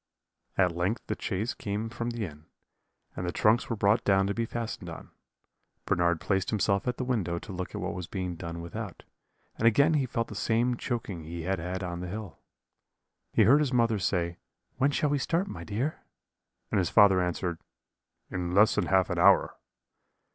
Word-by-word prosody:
"At 90 Hz, -2 st, +4 dB
length 90 Hz, +7 st, -1 dB
the -, -, -2 dB
chaise 105 Hz, +4 st, -2 dB
came 105 Hz, +2 st, -3 dB
from 120 Hz, +1 st, -4 dB
the 120 Hz, -2 st, -3 dB
inn, 75 Hz, -2 st, -11 dB, 0.7 s
and -, -, -4 dB
the 90 Hz, -, -1 dB
trunks 110 Hz, +6 st, +2 dB
were 115 Hz, -, 0 dB
brought 100 Hz, +2 st, +3 dB
down 95 Hz, -1 st, +3 dB
to 100 Hz, -, 0 dB
be 115 Hz, +1 st, -2 dB
fastened 115 Hz, -1 st, -5 dB
on. -, -, -9 dB, 0.7 s
"Bernard 85 Hz, -1 st, +2 dB
placed 95 Hz, +1 st, 0 dB
himself 100 Hz, -1 st, +1 dB
at 125 Hz, -, -1 dB
the -, -, -2 dB
window 105 Hz, -10 st, -1 dB
to 100 Hz, -, -8 dB
look 90 Hz, 0 st, -5 dB
at -, -, -4 dB
what -, -, -2 dB
was 90 Hz, -2 st, -5 dB
being 90 Hz, -1 st, -3 dB
done 85 Hz, 0 st, -6 dB
without; 85 Hz, -, -7 dB, 0.5 s
and 115 Hz, -, +3 dB
again 140 Hz, +8 st, +5 dB
he 140 Hz, -4 st, +1 dB
felt 115 Hz, -1 st, -2 dB
the -, -, -8 dB
same 120 Hz, +2 st, +1 dB
choking 115 Hz, -9 st, -4 dB
he 85 Hz, +1 st, -6 dB
had 95 Hz, +1 st, -1 dB
had 90 Hz, +3 st, -4 dB
on 85 Hz, -1 st, -4 dB
the 90 Hz, -, -5 dB
hill. 100 Hz, -4 st, -7 dB, 0.9 s
"He 110 Hz, -, +4 dB
heard 130 Hz, +8 st, +6 dB
his 145 Hz, -4 st, +1 dB
mother 115 Hz, -3 st, +3 dB
say, 85 Hz, -2 st, -1 dB, 0.4 s
'When 135 Hz, +3 st, +3 dB
shall 145 Hz, 0 st, +1 dB
we 145 Hz, -, +1 dB
start, 170 Hz, +8 st, 0 dB
my -, -, -7 dB
dear?' 120 Hz, +9 st, -2 dB, 0.7 s
and -, -, +2 dB
his 90 Hz, -3 st, +1 dB
father 100 Hz, -3 st, +6 dB
answer, 90 Hz, -1 st, -2 dB, 0.7 s
'In 90 Hz, -1 st, -2 dB
less 105 Hz, +2 st, +6 dB
than 100 Hz, -5 st, 0 dB
half 95 Hz, 0 st, +3 dB
an 90 Hz, -, -1 dB
hour.' 95 Hz, +2 st, +5 dB
100 Hz, 195 wpm, -29 LUFS, 90-115 Hz, 0.9 s, heard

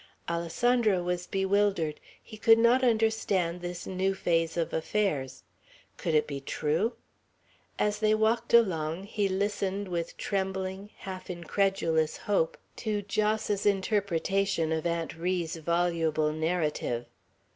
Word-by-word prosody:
Alessandro 190 Hz, +4 st, +1 dB
was 180 Hz, 0 st, -2 dB
bewildered. 195 Hz, -5 st, +1 dB, 0.2 s
He 220 Hz, -, -11 dB
could 225 Hz, +1 st, +6 dB
not 235 Hz, +3 st, +4 dB
understand 220 Hz, -7 st, +1 dB
this 175 Hz, 0 st, -5 dB
new 190 Hz, +1 st, 0 dB
phase 165 Hz, -2 st, 0 dB
of 165 Hz, -, -1 dB
affairs, 160 Hz, -7 st, -1 dB, 0.5 s
Could 165 Hz, -, -1 dB
it 150 Hz, -, +4 dB
be 140 Hz, -2 st, -5 dB
true? 160 Hz, -, 0 dB, 0.8 s
As 210 Hz, 0 st, 0 dB
they 215 Hz, 0 st, +3 dB
walked 225 Hz, +2 st, +1 dB
along, 175 Hz, -7 st, +3 dB
he 205 Hz, -1 st, -1 dB
listened 200 Hz, 0 st, -1 dB
with 170 Hz, -2 st, -3 dB
trembling, 190 Hz, 0 st, -3 dB
half 185 Hz, -1 st, -8 dB
incredulous 170 Hz, -2 st, 0 dB
hope 195 Hz, -6 st, 0 dB, 0.2 s
to 210 Hz, -2 st, -2 dB
Jos's 210 Hz, 0 st, 0 dB
interpretation 195 Hz, -3 st, +1 dB
of 160 Hz, +1 st, 0 dB
Aunt 170 Hz, -1 st, -2 dB
Ri's 170 Hz, -1 st, -2 dB
voluble 165 Hz, -2 st, +1 dB
narrative. 155 Hz, -7 st, -1 dB
190 Hz, 120 wpm, -29 LUFS, 165-205 Hz, 0.8 s, could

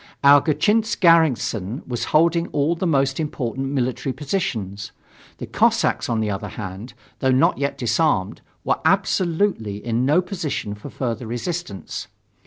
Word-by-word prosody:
Our 140 Hz, 0 st, +8 dB
Gatchinsk 210 Hz, +8 st, +1 dB
garrison 140 Hz, -, +2 dB
was 120 Hz, -2 st, -3 dB
holding 165 Hz, +2 st, +2 dB
all 150 Hz, +3 st, 0 dB
the 175 Hz, +2 st, -2 dB
most 135 Hz, -3 st, +1 dB
important 135 Hz, -4 st, -3 dB
military 130 Hz, -1 st, -2 dB
positions. 110 Hz, -, -3 dB, 0.5 s
The -, -, -6 dB
Cossacks, -, -, +1 dB
on 115 Hz, -2 st, 0 dB
the 105 Hz, -1 st, -1 dB
other 100 Hz, -, -4 dB
hand, 105 Hz, +4 st, -8 dB, 0.2 s
though 130 Hz, -, +1 dB
not 130 Hz, 0 st, +3 dB
yet 140 Hz, 0 st, -1 dB
disarmed, 115 Hz, -, 0 dB, 0.2 s
were -, -, 0 dB
absolutely 165 Hz, -, +1 dB
in 120 Hz, +1 st, 0 dB
no 145 Hz, +6 st, +4 dB
position 165 Hz, -, -4 dB
for 105 Hz, +7 st, -9 dB
further 120 Hz, -3 st, -4 dB
resistance. 120 Hz, -, -5 dB
135 Hz, 140 wpm, -22 LUFS, 115-165 Hz, 0.5 s, Our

